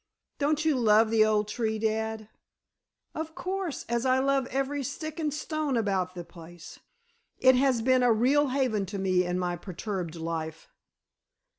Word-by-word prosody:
Don't 305 +2 +1
you 305 -4 +3
love 220 -1 +4
the 225 -1 +5
old 215 -1 +2
tree, 220 0 -2
dad?" 220 0 -2 0.9
"Of 320 0 -5
course, 375 -4 -4
as 235 0 -1
I 260 0 +3
love 270 -1 +1
every 275 +2 -2
stick 310 +4 -5
and 305 -2 0
stone 300 -2 -2
about 190 -4 -1
the 175 - -6
place. 170 0 -13 0.6
It 260 0 +6
has 255 -3 +2
been 255 +1 +4
a 245 -1 +4
real 265 +6 +3
haven 250 -7 0
to 200 +2 -5
me 185 -1 +2
in 180 0 -2
my 180 -1 -1
perturbed 180 -1 -5
life." 160 -1 -5
225 Hz, 160 wpm, -28 LUFS, 190-275 Hz, 0.9 s, It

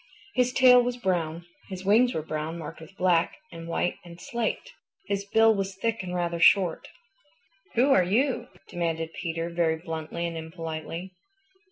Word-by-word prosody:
His 250 -1 +2
tail 250 -1 +7
was 245 0 -2
brown. 170 -6 -1 0.2
His 190 -1 -7
wings 235 +5 +4
were 155 - -2
brown, 155 +1 -4
marked 160 -1 -8
with 165 +5 -14
black 175 -3 +2
and 165 0 -9
white 175 +1 -1
and 170 -1 -12
slate. 235 - -3 0.3
His 200 0 -2
bill 225 +2 +5
was 195 -2 -3
thick 225 +2 -1
and 180 -1 -5
rather 170 -1 -1
short. 180 0 +4 0.9
"Who 255 +4 +4
are 190 - +6
you?" 240 +6 +1 0.2
demanded 165 -1 -3
Peter 165 0 -3
very 170 -1 +1
bluntly 160 0 -5
and 170 -1 -4
impolitely. 165 +2 -6
175 Hz, 160 wpm, -27 LUFS, 165-215 Hz, 0.9 s, tail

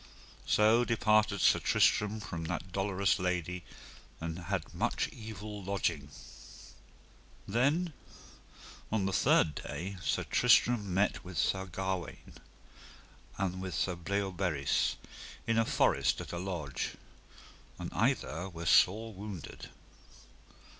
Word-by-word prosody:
So 110 +3 +5
departed 110 -3 +2
Sir - - +5
Tristram 105 +1 +2
from 85 -5 -5
that 85 +2 -4
dolorous 100 +2 +1
lady, 90 -1 -2 0.6
and 80 +1 -4
had 85 - -3
much - - 0
evil 105 -2 -8
lodging. 90 -7 -1 1.4
Then 145 - +1 1.0
on 105 -3 +1
the 95 - -1
third 75 - +4
day 90 +9 -5
Sir - - 0
Tristram 115 -3 +3
met 100 +3 +1
with 90 -2 -8
Sir 95 +4 +1
Gawaine 95 -1 -4 1.0
and 95 -1 -2
with 95 -1 -4
Sir 90 - 0
Bleoberis 90 -5 0 0.5
in 115 0 +2
a 115 - +3
forest - - +2
at - - -7
a 85 - -3
lodge, 85 -7 -4 0.8
and - - -6
either 85 +5 0
were 85 -1 -7
sore 110 +7 +4
wounded. 100 -4 -8
95 Hz, 115 wpm, -32 LUFS, 90-105 Hz, 1.4 s, So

